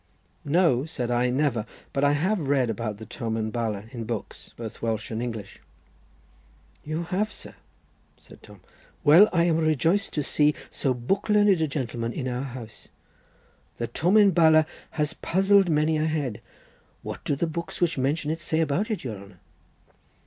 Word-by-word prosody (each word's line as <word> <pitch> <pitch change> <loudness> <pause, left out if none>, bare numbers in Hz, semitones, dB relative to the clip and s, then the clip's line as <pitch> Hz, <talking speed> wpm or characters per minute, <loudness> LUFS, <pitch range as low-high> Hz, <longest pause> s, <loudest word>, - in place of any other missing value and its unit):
"No," 145 -4 +3
said 125 -6 -3
I, 120 +1 +2
"never, 130 -3 +1 0.3
but 140 -1 0
I 145 0 +4
have 165 0 0
read 130 -5 +2
about 110 -1 -4
the 110 - -9
Tomen 110 -5 -3
Bala 110 -3 -2
in 115 -3 -6
books, 115 -2 -6
both 115 -1 -8
Welsh 110 -1 -2
and 110 +1 -3
English." 115 -5 -6 1.2
"You 155 +3 -3
have, 195 +5 -1
sir?" - - -10 0.6
said - - -17
Tom. - - -15 0.4
"Well, 165 +8 +7
I 170 -2 +3
am 170 -2 +2
rejoiced 160 - +1
to 150 - -1
see 150 +1 +2 0.2
so 130 -2 -1
book 195 - -1
learned 205 -4 +4
a 160 - +2
gentleman 120 -4 -3
in 130 -4 -3
our 125 0 -2
house. 125 -5 -8 0.9
The 120 - -2
Tomen 195 - +4
Bala 160 -2 +5 0.3
has 150 +1 0
puzzled 195 +2 +3
many 155 0 +2
a 155 +1 +1
head. 145 -9 -2 0.6
What - - -7
do 145 - 0
the 155 - 0
books 170 +1 -5
which 170 -5 +1
mention 150 +4 0
it 165 - -3
say 160 -1 -1
about 165 +8 0
it, 215 -6 -3
your 115 -6 -5
honour?" 100 -2 -14
145 Hz, 170 wpm, -26 LUFS, 120-165 Hz, 1.2 s, Well